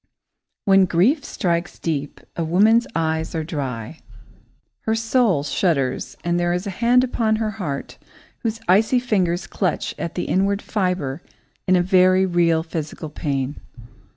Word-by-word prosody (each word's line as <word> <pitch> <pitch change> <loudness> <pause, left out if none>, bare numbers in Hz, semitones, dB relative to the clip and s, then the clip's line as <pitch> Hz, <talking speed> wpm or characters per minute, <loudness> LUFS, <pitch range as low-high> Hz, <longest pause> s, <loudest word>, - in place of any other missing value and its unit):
When 195 -2 +5
grief 215 - +2
strikes 170 -6 -2
deep, 145 -3 -3
a 170 - -1
woman's 210 +8 +4
eyes 160 0 -1
are 160 - -1
dry. 135 -3 -5 0.9
Her 220 - +2
soul 225 - +2
shudders 145 -4 -1
and 175 0 0
there 175 0 +1
is 180 +3 -2
a 200 - -3
hand 240 +6 +3
upon 230 -3 +1
her 215 -1 -1
heart 140 -6 -5 0.4
whose 225 -1 -3
icy 220 +7 +4
fingers 190 -7 0
clutch 180 -6 -2
at 170 - -4
the 175 - -1
inward 195 +2 +1
fibre 180 - -2 0.5
in 185 - +5
a 175 - +3
very 185 0 +4
real 170 -3 +2
physical 160 -1 -5
pain. 140 -2 -3
180 Hz, 145 wpm, -22 LUFS, 160-210 Hz, 0.9 s, When